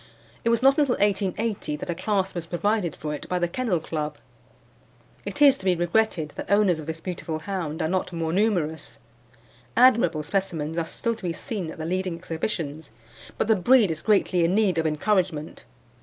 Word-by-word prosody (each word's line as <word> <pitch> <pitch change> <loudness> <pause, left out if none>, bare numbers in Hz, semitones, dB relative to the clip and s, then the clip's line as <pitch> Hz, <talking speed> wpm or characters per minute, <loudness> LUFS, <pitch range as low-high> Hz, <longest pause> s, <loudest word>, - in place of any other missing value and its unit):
It 230 - +2
was 230 +1 +2
not 275 +2 +5
until 275 -4 +3
1880 200 -3 0
that - - -7
a - - -1
class 195 +1 -1
was 170 -2 -5
provided 185 -1 0
for 150 -1 -4
it 150 - -7
by 180 - 0
the 175 -1 +1
Kennel 205 -2 -1
Club. 150 -2 -4 1.1
It 245 +9 +1
is 275 -2 +6
to 190 - -10
be 185 -2 +3
regretted 175 -3 0
that - - -6
owners 200 -5 +4
of 155 - -8
this 160 0 -4
beautiful 170 -2 -4
hound 160 -3 -3
are - - +1
not 185 +2 -1
more 165 -1 -2
numerous. 175 -7 0 0.8
Admirable 235 -11 +5
specimens 165 -3 -2
are 165 -1 -1
still 230 +6 -2
to 225 - -12
be 175 -2 -1
seen 190 -2 -5
at - - -8
the 160 - -5
leading 185 0 -1
exhibitions, 160 -2 -4 0.5
but - - 0
the 220 - +5
breed 215 0 +4
is 155 -1 -4
greatly 195 -4 +2
in 170 +3 +2
need 200 -6 +2
of 160 - +1
encouragement. 160 - -1
180 Hz, 190 wpm, -25 LUFS, 160-210 Hz, 1.1 s, is